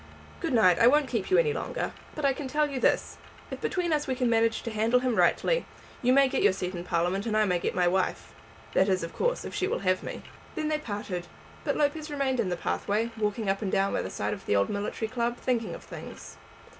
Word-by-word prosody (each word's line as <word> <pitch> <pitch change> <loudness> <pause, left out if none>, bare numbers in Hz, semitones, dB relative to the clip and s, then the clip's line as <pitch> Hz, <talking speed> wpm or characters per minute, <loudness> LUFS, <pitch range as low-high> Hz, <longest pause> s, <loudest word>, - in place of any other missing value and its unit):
Good 330 -6 -2
night; 185 -7 +5
I 235 - +7
won't 290 +2 +4
keep 225 -7 -2
you 375 - +4
any 465 -2 +3
longer. - - -3 0.2
But 305 - -2
I 275 - +4
can 270 +1 -5
tell 300 +3 +1
you 275 -3 -4
this; - - +1 0.3
if - - -6
between 350 -3 0
us 300 0 0
we 260 - 0
can 250 -2 +1
manage 225 0 +2
to 230 - -4
handle 225 +3 +2
him 250 -2 0
rightly, - - +2 0.3
you 250 - +3
may 275 +1 +6
get - - -1
your - - +5
seat 185 -1 -4
in 175 -1 -5
Parliament 180 +5 0
and 215 -1 +1
I 215 - +4
may 180 -3 +1
get - - -2
my 180 -1 +3
wife; 185 +1 -1 0.4
that 190 - +3
is, 185 -2 +1
of 165 - -6
course, - - 0
if - - -6
she 380 - 0
will 200 - -2
have 185 0 +2
me." - - -7 0.3
Then 310 -1 -1
they 305 -1 0
parted, 205 -8 -5 0.4
but - - -1
Lopez 300 +1 0
remained 275 -3 -1
in 210 -5 +1
the 175 - -2
pathway, 215 +6 -1
walking 210 0 -1
up 195 +2 0
and 195 -3 -2
down 195 +1 +1
by - - 0
the - - -4
side 105 +2 -2
of - - -9
the - - +2
old 100 0 +2
military 210 +2 -2
club, 240 0 -1
thinking 240 -3 -1
of - - -11
things. - - -10
230 Hz, 250 wpm, -28 LUFS, 195-275 Hz, 0.4 s, I